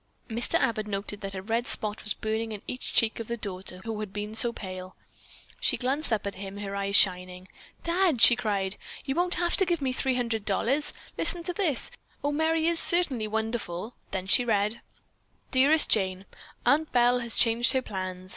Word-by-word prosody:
Mr. 235 +1 -1
Abbott 215 -2 +1
noted 205 0 -5
that 195 -1 -6
a 190 - -5
red 230 +3 -1
spot 210 0 -1
was 210 - 0
burning 220 +1 -3
in 205 - -8
each 250 - -5
cheek 225 0 +3
of 225 - -5
the 235 - -3
daughter 185 -3 -6
who 225 -1 -4
had 210 -2 -5
been 210 +1 -5
so 235 +2 +3
pale. 185 -4 -8 0.6
She - - +1
glanced 270 +3 0
up 215 -2 0
at 200 - -3
him, 195 +1 -8
her 200 -1 -5
eyes 200 0 -1
shining. 180 -1 +2 0.4
"Dad," 340 -5 +2
she 240 - +9
cried, 205 -5 -1 0.3
"you 270 - -1
won't 355 +3 +1
have 345 -1 +1
to 390 - +3
give 345 -2 0
me 265 -2 -1
$300. 245 +2 0 0.3
Listen 345 -2 0
to 360 - -3
this. 340 - +1 0.3
Oh, 290 - +1
Merry 320 +2 +1
is 335 0 +3
certainly 280 -11 +3
wonderful!" 220 -2 -3 0.2
Then 190 -1 -4
she 220 +6 +3
read: 215 0 0 0.7
"Dearest 285 +4 +5
Jane: 190 -2 +1 0.4
Aunt 310 +2 +3
Belle 245 0 +4
has 235 -1 -1
changed 240 +2 +4
her 260 -1 +1
plans. 185 -2 -6
225 Hz, 185 wpm, -27 LUFS, 200-260 Hz, 0.7 s, she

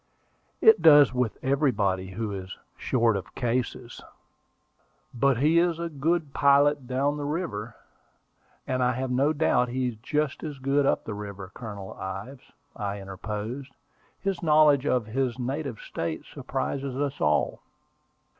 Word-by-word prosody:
"It 445 0 +7
does 145 -4 +7
with 125 -3 -1
everybody 105 -10 +1
who 105 +2 -4
is 95 -1 -6 0.2
short 115 -3 +1
of 100 - -6
cases." 120 0 -2 1.1
"But 135 +1 +2
he 155 +6 +4
is 170 -1 +2
a 170 0 -3
good 155 0 -1
pilot 140 -1 +4
down 140 +3 0
the 145 - -4
river, 145 - -3 0.9
and 130 0 -1
I 125 0 +2
have 130 +1 -3
no 135 +4 +3
doubt 145 -5 +2
he 125 0 -1
is 115 - -9
just 150 +5 -2
as 150 -3 -5
good 135 +1 +1
up - - +1
the 110 - -4
river, 100 -2 -7
Colonel 100 -5 -8
Ives," 95 +8 -7 0.2
I 100 -1 -4
interposed. 105 +7 -6 0.4
"His 195 -1 -2
knowledge 150 -3 +4
of 125 -6 +1
his 125 +2 -1
native 130 -1 -3
State 80 -1 -4
surprises 135 -1 -4
us 140 0 -2
all." 75 0 +1
130 Hz, 145 wpm, -26 LUFS, 110-145 Hz, 1.1 s, It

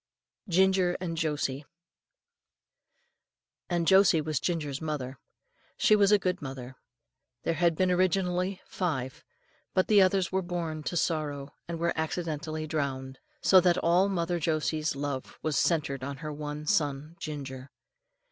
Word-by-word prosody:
GINGER 185 0 +3
AND 175 -2 -3
JOSIE. 150 -4 -1 2.1
And 175 -2 0
Josie 190 -2 +6
was 155 -2 -1
Ginger's 150 -5 -2
mother. 145 -4 -4 0.6
She 235 -3 +5
was 205 -1 +4
a 210 - +7
good 185 -2 -2
mother. 135 -2 -7 0.7
There 165 - +1
had 170 0 +2
been 185 +2 +2
originally 185 +1 +1
five, 135 -8 -3 0.5
but 185 - +3
the 210 -2 +6
others 185 -1 +2
were 190 0 +1
born 170 -3 -3
to 175 - -2
sorrow, 145 -4 -1
and 170 -1 -4
were 170 +1 0
accidentally 160 -1 -3
drowned; 135 -4 -3 0.2
so 190 -1 +7
that 175 -1 +3
all 180 +4 +3
mother 175 -2 -1
Josie's 155 -1 0
love 140 -2 -4
was 155 -2 0
centred 140 -5 +1
in 140 +1 -5
her 150 +2 -5
one 150 0 -5
son 150 -3 0
Ginger. 135 -3 -6
160 Hz, 140 wpm, -29 LUFS, 145-180 Hz, 2.1 s, a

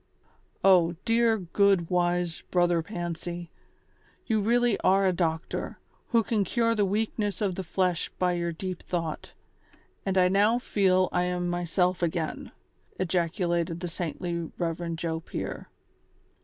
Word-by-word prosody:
" - - -39
O 170 -1 +3
dear, 230 -1 +3
good, 190 -1 +2
wise 175 -1 +1
Brother 175 -2 +3
Pancy, 175 -1 -5 0.7
you 220 -3 +1
really 240 +1 +2
are 195 +1 +3
a 185 - +3
doctor, 165 -2 -2 0.3
who 230 -2 +3
can 215 -2 +1
cure 230 +4 +1
the 210 -3 +2
weakness 205 -1 -1
of 200 -3 0
the 190 - -4
flesh 180 0 0
by 180 -1 +2
your 170 -1 -1
deep 180 +2 -5
thought, 165 -3 -4 0.7
and 190 -1 -1
I 180 -1 +6
now 205 +5 +3
feel 190 -6 +2
I 180 0 +1
am 180 0 -1
myself 175 +1 0
again," 165 -2 -2 0.5
ejacu 180 0 0
lated 170 -1 0
the 180 - -4
saintly 170 0 -4
Rev. 170 -1 -2
Joe 160 0 -2
Pier. - - -6
180 Hz, 140 wpm, -27 LUFS, 170-195 Hz, 0.7 s, I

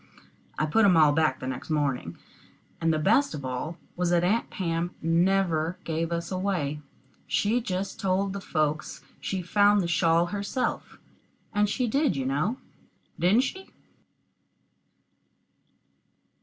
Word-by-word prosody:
I 155 - +1
put 220 +9 +3
'em 185 -4 +5
all 155 -2 +6
back 155 -3 +1
the - - -6
next 130 +3 -5
morning, 135 - -1 0.6
and 165 0 +2
the 155 - +1
best 215 - +2
of 140 - -7
it - - -5
all 130 +6 -4 0.2
was 180 0 0
that 175 0 +3
Aunt 215 +6 +1
Pam 170 -1 -2
never 170 0 +1
gave 165 +1 -2
us 170 +1 -3
away. 180 -6 -1 0.5
She 225 +4 +1
just 195 -2 -4
told 195 0 0
the 200 - -5
folks 155 -3 -2 0.2
she 190 -2 -3
found 205 +3 +4
the 180 - 0
shawl 165 +1 +3
herself, 205 +5 -3 0.6
and 205 0 +2
she 250 +4 0
did, 275 - +1
you 135 - -2
know 155 - 0 0.6
didn't 190 +8 +4
she? 380 +8 -5
175 Hz, 140 wpm, -27 LUFS, 155-200 Hz, 0.6 s, all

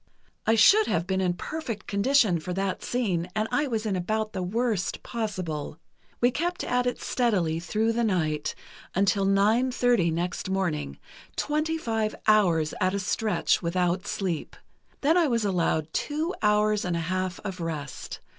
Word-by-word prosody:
I 225 - +5
should 410 - +6
have 170 0 0
been 190 0 0
in 180 -1 +1
perfect 235 - -5
condition 205 -3 +3
for 180 +3 -5
that 195 0 -2
scene, 185 -8 -1
and 215 +1 0
I 290 0 +1
was 225 -3 -2
in 205 -3 0
about 215 +4 -1
the 190 - -3
worst 210 0 -1
possible. 185 - -4 0.4
We 245 +1 +4
kept 345 +6 -2
at 250 0 +1
it 245 - -2
steadily 185 -10 0
through 215 +6 0
the 235 +1 0
night, 155 -8 0 0.4
until 195 +1 +2
nine 210 +6 +3
thirty 245 -8 +2
next 175 +3 -2
morning, 170 - -1 0.4
twenty 305 +2 0
five 225 -6 -1
hours 175 -8 +3
at 185 +1 +2
a - - 0
stretch, 210 +3 +1
without 180 +2 0
sleep. 180 -6 -3 0.5
Then 315 +5 +4
I 335 - +3
was 230 -4 +1
allowed 165 -5 0
two 310 +4 -1
hours 210 0 +3
and 175 -2 -1
a - - -1
half 185 +2 -2
of 190 -4 -5
rest. 155 -4 -5
200 Hz, 165 wpm, -27 LUFS, 180-230 Hz, 0.5 s, should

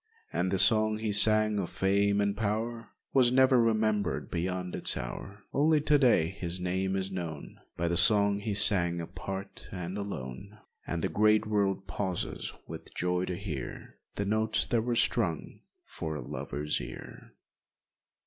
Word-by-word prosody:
And 95 - 0
the 95 - 0
song 110 +1 +4
he 110 -1 -2
sang 110 0 +5
of 90 - -3
fame 100 +1 +1
and 100 0 0
power 115 +2 -3 0.2
Was 125 -3 +4
never 130 -1 +4
remembered 110 -4 0
beyond 90 +1 -3
its - - +1
hour! 100 - -7
Only 150 +2 +3
to 150 0 +3
day 115 - +3
his 90 -2 -4
name 95 +1 -1
is 95 0 -3
known 85 -5 -7 0.2
By 85 - -1
the 85 0 0
song 100 0 +4
he 105 -1 -3
sang 85 -4 +5
apart 95 +3 -7
and 90 +2 -5
alone, 100 +1 -7 0.3
And 85 -1 -3
the - - +2
great 105 +5 +2
world 100 -2 0
pauses 95 +1 -4 0.2
with - - -9
joy 90 +1 -1
to 90 - -4
hear 85 -9 -7 0.2
The 100 - -2
notes 110 +2 0
that 115 - 0
were 120 +1 -2
strung 95 -9 0 0.3
for 80 -1 -6
a 75 - -5
lover's 75 +4 -3
ear. - - -11
100 Hz, 160 wpm, -29 LUFS, 90-110 Hz, 0.3 s, sang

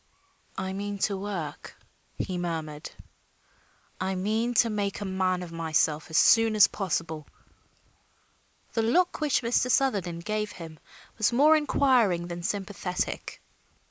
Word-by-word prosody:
"I 190 0 -3
mean 200 +1 -4
to 200 - -2
work," 190 -7 -6 0.4
he 185 - -3
murmured. 160 -4 -4 1.1
"I 190 +1 -1
mean 220 +6 -1
to 230 - +5
make 200 -2 -2
a 205 - -4
man 185 -1 0
of 175 - -9
myself 160 -1 0
as 160 - 0
soon 225 -1 +5
as 210 - +8
possible." 165 -5 -3 1.5
The 225 - +1
look 340 +11 +1
which 295 -4 +1
Mr. 240 +2 +1
Sutherland 190 -11 0
gave 215 0 -2
him 160 -3 -10 0.4
was 220 - +3
more 295 +6 +5
inquiring 245 - +2
than 175 0 -5
sympathetic. 195 -1 -4
195 Hz, 130 wpm, -27 LUFS, 170-225 Hz, 1.5 s, as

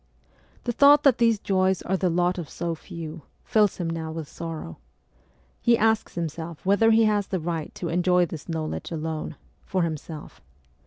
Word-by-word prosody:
The 240 - -1
thought 285 +4 +6
that 270 -5 +5
these 230 -2 +4
joys 190 -2 +1
are 190 - 0
the 185 -1 +1
lot 175 +2 +1
of 165 - -6
so 170 0 -3
few, 165 0 -8 0.2
fills 210 -3 +2
him 175 - -2
now 165 -1 -3
with 160 -2 -5
sorrow. 160 - -7 0.8
He 235 -1 +4
asks 220 -1 +1
himself 165 0 -5
whether 205 +4 +4
he 225 0 +5
has 210 -2 +2
the 190 - -2
right 165 -1 -3
to 170 - -4
enjoy 180 +1 +3
this 165 0 -9
knowledge 160 -1 -3
alone 160 -1 -4 0.3
for 185 -2 0
himself. 160 -1 -6
175 Hz, 170 wpm, -25 LUFS, 160-200 Hz, 0.8 s, thought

